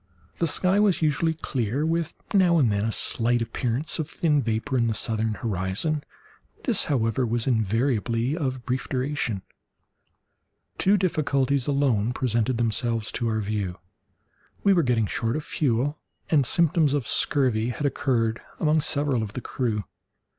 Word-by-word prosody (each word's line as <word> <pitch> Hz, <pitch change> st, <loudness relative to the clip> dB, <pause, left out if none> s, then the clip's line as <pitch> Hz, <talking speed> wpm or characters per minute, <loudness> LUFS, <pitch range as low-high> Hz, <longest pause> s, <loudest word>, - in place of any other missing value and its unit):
The 170 Hz, -, +2 dB
sky 185 Hz, +5 st, +2 dB
was 200 Hz, -5 st, +2 dB
usually 160 Hz, +2 st, +1 dB
clear, 130 Hz, -1 st, -2 dB
with 165 Hz, 0 st, -1 dB, 0.2 s
now 180 Hz, -4 st, +4 dB
and 130 Hz, -8 st, +3 dB
then 100 Hz, 0 st, 0 dB
a 115 Hz, -, 0 dB
slight 120 Hz, +2 st, +2 dB
appearance 120 Hz, +6 st, -1 dB
of 155 Hz, -1 st, -2 dB
thin 155 Hz, -5 st, +1 dB
vapour 115 Hz, +4 st, -2 dB
in 120 Hz, -2 st, +2 dB
the 110 Hz, -, 0 dB
southern 110 Hz, -1 st, 0 dB
horizon—this, 120 Hz, -, -3 dB
however, 120 Hz, -3 st, 0 dB
was 120 Hz, -1 st, -1 dB
invariably 115 Hz, +2 st, 0 dB
of 130 Hz, -6 st, -3 dB
brief 125 Hz, +1 st, -2 dB
duration. 130 Hz, -6 st, -2 dB, 1.4 s
Two 200 Hz, +2 st, +4 dB
difficulties 140 Hz, -7 st, 0 dB
alone 130 Hz, -6 st, +1 dB
presented 120 Hz, -1 st, 0 dB
themselves 115 Hz, -1 st, 0 dB
to 120 Hz, -, -2 dB
our 110 Hz, -1 st, 0 dB
view; 100 Hz, -3 st, -3 dB, 0.9 s
we 200 Hz, -, +5 dB
were 175 Hz, -, +4 dB
getting 120 Hz, -6 st, +1 dB
short 115 Hz, +3 st, -1 dB
of 155 Hz, -, -3 dB
fuel, 140 Hz, +1 st, 0 dB, 0.3 s
and 145 Hz, -6 st, +3 dB
symptoms 160 Hz, -3 st, +3 dB
of 135 Hz, -7 st, -2 dB
scurvy 125 Hz, -5 st, +1 dB
had 145 Hz, +4 st, -3 dB
occurred 120 Hz, -5 st, 0 dB, 0.2 s
among 155 Hz, 0 st, +2 dB
several 145 Hz, -5 st, +1 dB
of 105 Hz, -2 st, -5 dB
the -, -, -4 dB
crew. 110 Hz, -6 st, -2 dB
130 Hz, 145 wpm, -25 LUFS, 115-150 Hz, 1.4 s, we